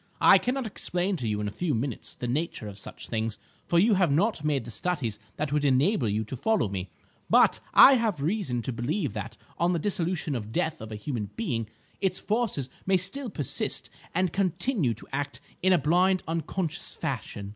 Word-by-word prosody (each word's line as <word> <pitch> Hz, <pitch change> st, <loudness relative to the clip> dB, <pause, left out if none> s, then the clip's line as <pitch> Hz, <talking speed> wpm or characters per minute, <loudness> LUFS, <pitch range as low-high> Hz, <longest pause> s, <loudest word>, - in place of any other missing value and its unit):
I -, -, +7 dB
cannot 255 Hz, +1 st, -1 dB
explain 190 Hz, -2 st, -1 dB
to 120 Hz, -, -3 dB
you 105 Hz, -1 st, -1 dB
in 105 Hz, -, -2 dB
a -, -, -3 dB
few 150 Hz, +7 st, -1 dB
minutes 120 Hz, +1 st, -4 dB
the 125 Hz, -, -4 dB
nature 135 Hz, -3 st, -2 dB
of 100 Hz, -1 st, -8 dB
such -, -, -7 dB
things, 110 Hz, -1 st, -2 dB, 0.3 s
for 170 Hz, -, +2 dB
you 210 Hz, +6 st, +5 dB
have 185 Hz, -5 st, +3 dB
not 175 Hz, +3 st, +1 dB
made 145 Hz, -6 st, 0 dB
the 120 Hz, -, -7 dB
studies 120 Hz, -, -2 dB, 0.2 s
that 150 Hz, -1 st, -2 dB
would 150 Hz, -1 st, +1 dB
enable 140 Hz, -, +3 dB
you 105 Hz, +2 st, 0 dB
to 110 Hz, +5 st, -6 dB
follow 215 Hz, -, +1 dB
me; 95 Hz, -1 st, -4 dB, 0.4 s
but -, -, +5 dB, 0.2 s
I 275 Hz, -, +10 dB
have 225 Hz, -, +1 dB
reason 150 Hz, -, -1 dB
to 130 Hz, -, -3 dB
believe 135 Hz, -, -1 dB
that 110 Hz, +2 st, -6 dB, 0.2 s
on 175 Hz, +2 st, +3 dB
the -, -, +1 dB
dissolution 170 Hz, -4 st, -1 dB
at 110 Hz, -2 st, -5 dB
death 160 Hz, +6 st, -1 dB
of 110 Hz, 0 st, -8 dB
a -, -, -4 dB
human 105 Hz, -2 st, -4 dB
being, 120 Hz, -, -2 dB, 0.3 s
its 190 Hz, -2 st, 0 dB
forces 210 Hz, -, -1 dB, 0.2 s
may 190 Hz, -1 st, +5 dB
still 215 Hz, +9 st, 0 dB
persist 145 Hz, -, -1 dB, 0.2 s
and 185 Hz, -2 st, +1 dB
continue 190 Hz, -, 0 dB
to -, -, -13 dB
act 145 Hz, +1 st, -3 dB, 0.2 s
in 190 Hz, -, +4 dB
a 180 Hz, -, +6 dB
blind, 180 Hz, +5 st, +3 dB
unconscious 165 Hz, +1 st, -3 dB
fashion. 100 Hz, -1 st, -4 dB
150 Hz, 200 wpm, -27 LUFS, 115-185 Hz, 0.4 s, I